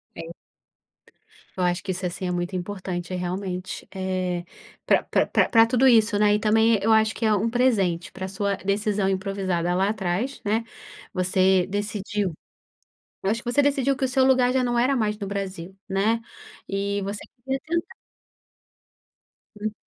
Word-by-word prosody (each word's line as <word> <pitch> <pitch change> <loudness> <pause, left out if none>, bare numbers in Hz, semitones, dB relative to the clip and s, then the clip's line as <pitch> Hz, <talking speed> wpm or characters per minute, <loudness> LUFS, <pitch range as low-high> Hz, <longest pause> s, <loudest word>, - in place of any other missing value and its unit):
É. 165 +1 -8 1.2
Eu 185 - 0
acho 175 0 0
que 195 - -2
isso 185 +1 -5
assim 180 +1 -4
é - - -1
muito 175 +1 -2
importante 180 -1 -4
realmente. 180 +1 -4
Eh, 185 -2 -2 0.4
pra - - +4
pra - - +1 0.2
pra 225 -1 +6
tudo 250 +2 +3
isso, 225 -3 +5
né. 210 0 +4
E - - 0
também 220 +1 +3
eu 220 +3 +2
acho 220 0 +4
que 230 - -3
é 215 - +4
um 210 +2 +1
presente 195 -8 +1
pra 190 0 -5
sua 200 +1 -1
decisão 200 0 0
improvisada 190 -3 -1
lá 190 +2 +2
atrás, 210 +6 -2
né. 215 +2 0 0.5
Você 185 0 +3
decidiu, 205 -1 -2 0.9
eu 195 - +1
acho 230 +2 -1
que 240 - -3
você 285 +4 +3
decidiu 275 -1 +2
que 265 - -1
o - - +1
seu 260 +1 +2
lugar 255 -1 +4
já 260 0 +2
não 240 -1 0
era 255 +3 +3
mais 215 -4 0
no 200 - -4
Brasil, 190 -2 -5
né. 210 +4 +1 0.5
E 200 +1 -1
você 200 +1 -4 0.2
queria 265 +2 -2
tentar. 340 +4 -2 1.7
Hum. 215 0 -3
200 Hz, 165 wpm, -24 LUFS, 185-225 Hz, 1.7 s, pra